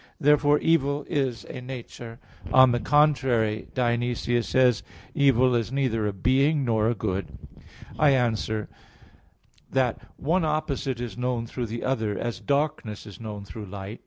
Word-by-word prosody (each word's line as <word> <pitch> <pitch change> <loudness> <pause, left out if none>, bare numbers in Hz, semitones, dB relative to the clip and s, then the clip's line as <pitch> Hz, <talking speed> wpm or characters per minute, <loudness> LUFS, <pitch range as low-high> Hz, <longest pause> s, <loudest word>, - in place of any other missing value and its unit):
Therefore 145 -1 +4
evil 145 -3 +1
is 135 -7 -1
a - - -8
nature. 120 -2 -8 0.3
On 130 -1 +7
the 120 - +1
contrary, 125 -5 +2
Dionysius 120 -1 0
says 125 -4 +3
(Div. - - -26
Nom. - - -20
iv), 140 - 0 0.2
"Evil 125 -1 +3
is 115 0 -1
neither 125 -6 0
a - - 0
being 135 - +2
nor 110 -2 +2
a 120 - 0
good." 95 -3 -3 0.6
I 150 - +5
answer 110 -5 0 1.0
that, 130 -3 0 0.2
One 165 +5 +1
opposite 145 -5 -1
is 120 0 -6
known 125 -2 -1
through 120 +1 -4
the 115 +2 -5
other, 110 -6 -1
as 120 - -3
darkness 140 -8 -2
is 105 -3 -11
known 105 -3 -7
through 105 +1 -8
light. 100 +3 -7
120 Hz, 160 wpm, -25 LUFS, 110-140 Hz, 1.0 s, On